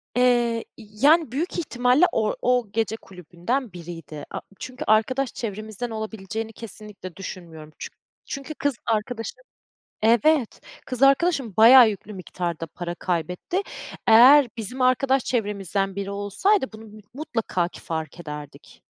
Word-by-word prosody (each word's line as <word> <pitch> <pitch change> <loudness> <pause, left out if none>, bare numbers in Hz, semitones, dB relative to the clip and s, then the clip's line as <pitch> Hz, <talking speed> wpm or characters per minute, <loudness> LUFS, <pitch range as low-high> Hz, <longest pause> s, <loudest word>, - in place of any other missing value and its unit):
Eee, 240 -2 +2
iii, 215 +2 -5
yani, 315 -3 +5
büyük 325 +8 -2
ihtimalle 250 0 +3
or 215 -1 0
o 250 -2 +2
gece 220 0 -1
kulübünden 185 - -4
biriydi. 165 -4 -9
A - - -4 0.2
çünkü 255 0 -6
arkadaş 245 +5 +2
çevremizden 215 +1 -5
olabileceğini 220 0 -5
kesinlikle 210 -5 -10
düşünmüyorum. 165 -5 -9
Çün - - -7 0.3
çünkü 275 +3 -6
kız 285 -1 -1
arkadaşım 225 - -2 0.6
Evet, 235 +4 +3 0.3
kız 255 0 -5
arkadaşım 275 - +3
bayağı 235 +2 +9
yüklü 210 0 -8
miktarda 175 -3 -4
para 175 +2 -6
kaybetti. 180 - -2 0.5
Eğer 250 +5 +8
bizim 235 +4 -4
arkadaş 260 +1 +3
çevremizden 200 -4 -1
biri 200 0 -3
olsaydı 205 - 0
bunu 220 0 -11
mü 215 0 -13
mutlaka 225 - -2
ki - - -13
fark 160 -1 -5
ederdik. 150 -3 -10
220 Hz, 130 wpm, -24 LUFS, 190-255 Hz, 0.6 s, bayağı